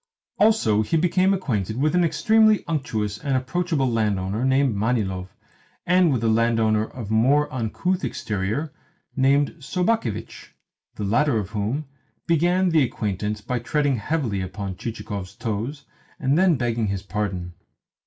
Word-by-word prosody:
Also, 205 - +4
he 135 +10 0
became 185 +3 +2
acquainted 115 - -1
with 150 +4 +1
an 180 0 +3
extremely 215 +7 +3
unctuous 110 -10 -2
and 140 -3 0
approachable 140 +2 -1
landowner 105 -2 0
named 130 -2 +2
Manilov, 100 -4 -1 0.6
and 180 -2 +4
with 120 -4 0
a - - +2
landowner 110 -1 +2
of 110 -3 -8
more 135 +7 +3
uncouth 170 - -1
exterior 105 +9 -3 0.4
named 140 +1 +3
Sobakevitch 175 - -2 0.4
the 105 - -5
latter 115 +6 +2
of 105 -2 -3
whom 110 +8 -2 0.4
began 175 +3 +2
the 160 -2 +4
acquaintance 105 -3 -2
by 125 +3 -2
treading 140 +2 0
heavily 115 -4 -1
upon 95 +1 -5
Chichikov's 100 -3 -6
toes, 115 +6 -4 0.3
and 135 +2 +1
then 180 -1 +4
begging 120 -3 -1
his 100 -1 -3
pardon. 95 -3 -3
120 Hz, 135 wpm, -23 LUFS, 105-155 Hz, 0.6 s, Also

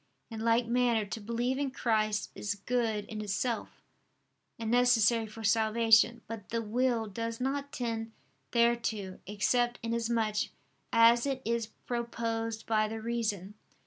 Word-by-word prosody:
In 225 - -5
like 230 +1 +2
manner, 235 -2 +2
to 210 +2 -6
believe 240 +5 -1
in 285 -1 0
Christ 215 -4 0
is 205 0 -3
good 220 0 -1
in 215 0 -6
itself, 215 +3 -2 0.9
and 225 -1 -3
necessary 235 -2 +4
for 225 +1 -10
salvation: 225 +1 +4
but 225 -3 -8
the 230 0 -1
will 235 +1 +1
does 230 +2 -4
not 280 +2 -2
tend 225 -2 -3 0.4
thereto, 235 -5 +1
except 240 +4 +1
inasmuch 230 -2 0 0.4
as 235 +2 +5
it 270 -2 -1
is 230 -1 0
proposed 230 -1 -3
by 215 -1 +2
the 220 +1 -5
reason. 220 -4 -2
230 Hz, 135 wpm, -31 LUFS, 215-235 Hz, 0.9 s, as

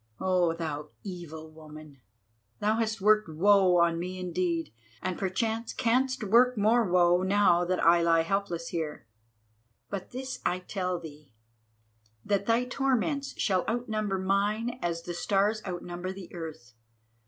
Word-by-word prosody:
Oh, 180 -3 +2
thou 150 -3 -5
evil 160 -5 -8
woman, 155 -3 -13 0.6
thou 215 +2 +1
hast 220 -2 -1
worked 215 -2 +4
woe 185 +2 +4
on 170 -1 +3
me 185 +2 -4
indeed, 175 - -2 0.3
and 185 - -3
perchance 220 +5 -2
canst 255 0 +1
work 240 +4 +4
more 220 +3 +4
woe 175 0 +4
now 190 -2 +3
that 185 +1 0
I 170 +1 +6
lie 165 -1 +3
helpless 175 -2 -2
here. 155 -7 -4 0.9
But 195 -2 -5
this 260 +1 -6
I 180 - +1
tell 185 -1 -3
thee, 150 -6 -13 0.9
that 200 -1 0
thy 230 +2 +2
torments 270 +2 -1
shall 185 -3 +1
outnumber 215 -4 -1
mine 205 +6 0
as 170 -1 -2
the 175 - -5
stars 205 +4 +1
outnumber 175 0 -5
the 190 -2 -10
earth. 155 -9 -8
185 Hz, 140 wpm, -28 LUFS, 170-215 Hz, 0.9 s, I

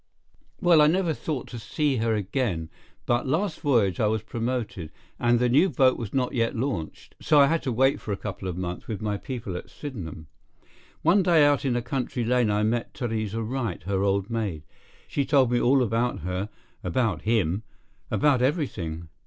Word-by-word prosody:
"Well, 175 -4 +6
I 150 - +6
never 170 0 +2
thought 145 -4 -4
to 120 - -7
see 145 +3 0
her 115 0 +1
again, 100 - -2 0.3
but 120 +2 +1
last 165 +6 0
voyage 115 - +2
I 110 - +3
was 110 0 0
promoted, 115 -8 -3 0.3
and 120 0 +3
the 125 +1 +2
new 145 +10 +4
boat 130 -6 +4
was 115 -5 -5
not 130 -2 0
yet 115 0 0
launched, 115 - -4
so 150 - +4
I 140 - +8
had 165 +3 +1
to 130 - -2
wait 135 +5 +2
for 105 - -5
a 100 - -1
couple 100 -2 -6
of 90 -1 -4
months 90 -1 -5
with 110 -3 -4
my 105 -1 -2
people 115 -6 -5
at - - -7
Sydenham. 95 - -7 0.8
One 175 +5 +5
day 170 -5 +5
out 145 -1 +2
in 130 -3 +1
a 120 - -1
country 125 -1 -2
lane 125 -1 +2
I 105 0 +1
met 115 +2 -1
Theresa 115 -2 -2
Wright, 115 -7 -3
her 95 +1 -1
old 100 0 +1
maid. 100 -10 -2 0.4
She 140 - 0
told 135 -3 +3
me 120 - +2
all 130 +1 +4
about 120 -1 0
her, 90 +4 -3 0.3
about 110 -9 0
him, 105 -4 +1 0.5
about 140 -4 +3
everything. 100 - -1
120 Hz, 190 wpm, -26 LUFS, 100-135 Hz, 0.8 s, I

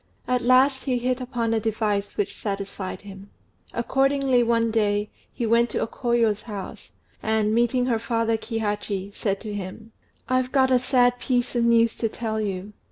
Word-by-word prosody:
At 250 -1 +1
last 260 +2 +4
he 255 -3 +1
hit 250 +1 -1
upon 240 -3 -1
a 225 - +2
device 210 -2 -1
which 200 -1 -1
satisfied 195 -2 -5
him. 195 0 -11 0.4
Accordingly 270 +1 +2
one 230 -1 +2
day 210 -1 +1 0.2
he 240 - -3
went 235 +1 +3
to - - -2
O - - +1
Koyo's 230 -3 0
house, 205 -4 -8 0.3
and, 220 -1 +1
meeting 240 +2 +2
her 235 -3 +1
father 230 0 0
Kihachi, 205 -3 -3
said 195 -2 -1
to 215 -2 -6
him 205 +3 -7 0.4
"I've 255 0 +1
got 260 -2 +3
a 255 - +5
sad 245 -1 +3
piece 245 -1 0
of 235 -1 +2
news 230 -1 +4
to 225 - 0
tell 220 -1 -3
you. 200 0 -4
230 Hz, 170 wpm, -24 LUFS, 210-245 Hz, 0.4 s, a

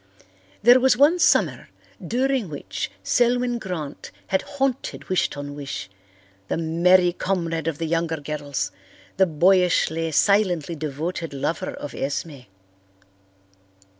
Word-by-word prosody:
There 245 +3 +8
was 260 -1 +3
one 300 +6 +5
summer - - +2 0.3
during 250 +1 0
which 145 -2 -5
Selwyn 245 0 +1
Grant 165 -8 -6 0.2
had 190 0 +2
haunted 270 -2 -3
Wish 185 - +2
ton 145 0 -7
wish, 140 -9 -6 0.6
the - - -1
merry 175 +2 +3
comrade 165 -4 -2
of 160 -3 -1
the 165 - -3
younger 165 0 -1
girls, 145 -9 -4 0.5
the 190 0 +4
boyishly, 165 -1 +2
silently 180 -2 +2
devoted 155 +1 -4
lover 145 +4 -2
of 145 - -7
Esme. 145 +1 -4
170 Hz, 115 wpm, -23 LUFS, 150-200 Hz, 0.6 s, There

